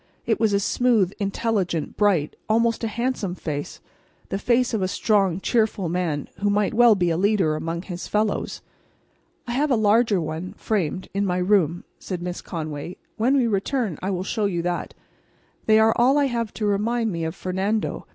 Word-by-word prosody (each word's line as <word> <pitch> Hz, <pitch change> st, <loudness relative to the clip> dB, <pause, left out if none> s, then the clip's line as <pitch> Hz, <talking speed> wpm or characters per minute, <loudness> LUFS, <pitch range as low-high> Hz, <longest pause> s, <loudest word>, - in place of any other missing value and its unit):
It 225 Hz, -, +1 dB
was 220 Hz, -2 st, +3 dB
a 200 Hz, -, +2 dB
smooth, 215 Hz, -2 st, +2 dB
intelligent, 195 Hz, -5 st, -1 dB
bright, 190 Hz, -8 st, +2 dB
almost 230 Hz, +1 st, +2 dB
a -, -, +1 dB
handsome 220 Hz, -4 st, -2 dB
face—the 155 Hz, +4 st, -7 dB
face 245 Hz, +2 st, +2 dB
of 220 Hz, -, 0 dB
a 185 Hz, -, +1 dB
strong, 195 Hz, -2 st, +1 dB
cheerful 215 Hz, -4 st, 0 dB
man 165 Hz, -4 st, -1 dB
who 205 Hz, +1 st, +1 dB
might 205 Hz, 0 st, +1 dB
well 235 Hz, -1 st, +6 dB
be 175 Hz, -3 st, +1 dB
a 165 Hz, -, 0 dB
leader 190 Hz, -5 st, +2 dB
among 165 Hz, +2 st, -4 dB
his 180 Hz, -2 st, -6 dB
fellows. 210 Hz, 0 st, -1 dB, 0.8 s
"I 240 Hz, -, -5 dB
have 285 Hz, +5 st, +1 dB
a 260 Hz, -, +4 dB
larger 215 Hz, -1 st, +3 dB
one, 165 Hz, +4 st, -5 dB
framed, 190 Hz, -4 st, -2 dB
in 200 Hz, +1 st, 0 dB
my 180 Hz, -2 st, 0 dB
room," 180 Hz, -3 st, +2 dB, 0.2 s
said 180 Hz, -2 st, -5 dB
Miss 180 Hz, 0 st, -4 dB
Conway. 155 Hz, 0 st, -6 dB, 0.2 s
"When 250 Hz, +5 st, +3 dB
we 255 Hz, -, +3 dB
return 215 Hz, -, -1 dB
I 190 Hz, -, -2 dB
will 185 Hz, -2 st, -2 dB
show 215 Hz, +2 st, -1 dB
you 175 Hz, -4 st, -1 dB
that. 175 Hz, 0 st, -3 dB, 0.7 s
They 215 Hz, 0 st, +6 dB
are 220 Hz, 0 st, +5 dB
all 255 Hz, +4 st, +4 dB
I 290 Hz, -, +3 dB
have 235 Hz, -4 st, -2 dB
to 215 Hz, -, -2 dB
remind 220 Hz, +3 st, 0 dB
me 165 Hz, -2 st, -3 dB
of 160 Hz, +2 st, -3 dB
Fernando. 195 Hz, +4 st, -2 dB
200 Hz, 180 wpm, -23 LUFS, 180-225 Hz, 0.8 s, well